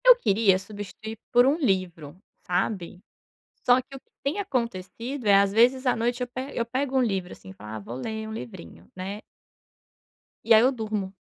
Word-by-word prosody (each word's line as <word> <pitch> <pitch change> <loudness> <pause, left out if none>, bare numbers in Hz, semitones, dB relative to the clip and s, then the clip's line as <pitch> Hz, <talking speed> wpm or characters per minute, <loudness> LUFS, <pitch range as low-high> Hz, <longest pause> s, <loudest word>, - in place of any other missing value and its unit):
Eu - - +10
queria 200 - +3
substituir 205 +2 -8
por 245 +1 +6
um 280 +4 +3
livro, 185 - -1 0.3
sabe? 180 -1 -2 0.7
Só 245 +1 +5
que 270 +2 -11
o - - -11
que - - -45
tem 290 +8 -1
acontecido 240 - -3
é 200 - +6
às 195 0 +4
vezes 250 +4 +4
à 250 - +4
noite 240 +2 -1
eu - - -1
pego 260 +3 -6
eu 235 - +1
pego 260 +3 -2
um 260 - +4
livro 190 -6 -1
assim 95 - -12
e - - -8
falo: 105 +2 -11
"Ah - - -4
vou 110 +3 -8
ler 220 - -4
um - - -6
livrinho 90 - -9
né". 195 +3 -5 1.2
E 230 - +5
aí 220 - +8
eu 255 +3 +4
durmo. 215 -5 -3
220 Hz, 195 wpm, -26 LUFS, 190-250 Hz, 1.2 s, Eu